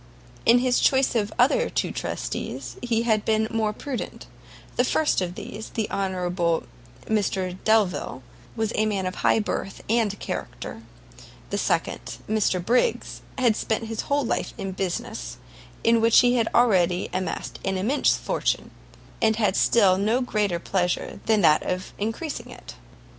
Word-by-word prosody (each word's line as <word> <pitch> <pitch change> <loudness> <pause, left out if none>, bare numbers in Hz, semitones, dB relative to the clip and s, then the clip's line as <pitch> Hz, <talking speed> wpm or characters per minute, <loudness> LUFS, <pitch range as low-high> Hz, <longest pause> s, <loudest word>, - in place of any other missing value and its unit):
In 235 +2 +8
his 250 0 +2
choice 265 0 +3
of 215 -4 +1
the - - -13
other 480 - +4
two - - -1
trustees - - -4
he 235 -2 0
had 220 -3 +2
been 220 0 +1
more 220 -2 +1
prudent; 255 +4 -6 0.5
the 245 - +3
first 295 -2 +2
of 180 -1 -3
these, 215 +2 -7
the 220 -2 -2
honourable 180 -3 0 0.4
Mr 190 -4 0
Delvile, 210 -11 +1 0.3
was 220 -1 -1
a 215 - +1
man 195 -3 -1
of 185 - -2
high - - +2
birth 205 -2 -3
and 220 -3 +1
character; - - -6 0.7
the - - 0
second, - - -1
Mr 195 -5 +1
Briggs, 250 - +1 0.2
had 240 -4 +3
spent 220 +1 -1
his 225 0 -3
whole 285 -1 0
life - - -2
in 195 -3 -4
business, 180 - -4 0.5
in 230 0 +4
which 230 0 +6
he 245 0 +4
had 230 -2 +2
already 185 -7 +3
amassed 185 0 -3
an 190 0 -1
immense 235 +10 +2
fortune, - - -1 0.5
and 220 -1 +4
had 210 -4 +1
still 195 -5 +4
no 220 +5 +2
greater 210 -7 0
pleasure 180 0 -1
than 220 -2 +4
that 155 -3 +5
of 185 +1 -3
encreasing 225 +9 -4
it. - - -11
215 Hz, 155 wpm, -25 LUFS, 190-230 Hz, 0.7 s, In